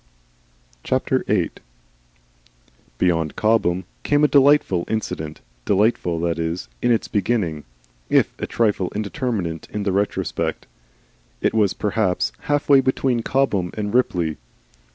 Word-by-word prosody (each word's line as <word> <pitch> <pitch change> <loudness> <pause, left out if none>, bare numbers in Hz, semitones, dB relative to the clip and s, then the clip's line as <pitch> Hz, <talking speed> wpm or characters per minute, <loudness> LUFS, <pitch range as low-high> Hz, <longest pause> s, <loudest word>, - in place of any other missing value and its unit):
VIII. 130 -8 +1 1.5
Beyond 80 -4 +1
Cobham 105 -5 +2 0.2
came 145 0 +2
a - - +7
delightful 140 -11 +4
incident, 80 -8 -4 0.2
delightful, 100 - +1
that 85 -1 -1
is, 85 +2 -3
in 120 - +2
its 115 - +1
beginning 100 -8 -1 0.4
if - - +3
a - - -2
trifle 105 -5 0
indeterminate 105 - -3
in 105 - -3
the 100 - 0
retrospect. 100 +2 -1 0.7
It - - +1
was 105 -3 +2
perhaps 95 - 0 0.2
half 145 0 +1
way 140 -2 +7
between 130 -2 0
Cobham 110 -9 0
and 105 -1 -3
Ripley. 90 -10 +1
105 Hz, 115 wpm, -22 LUFS, 85-120 Hz, 1.5 s, a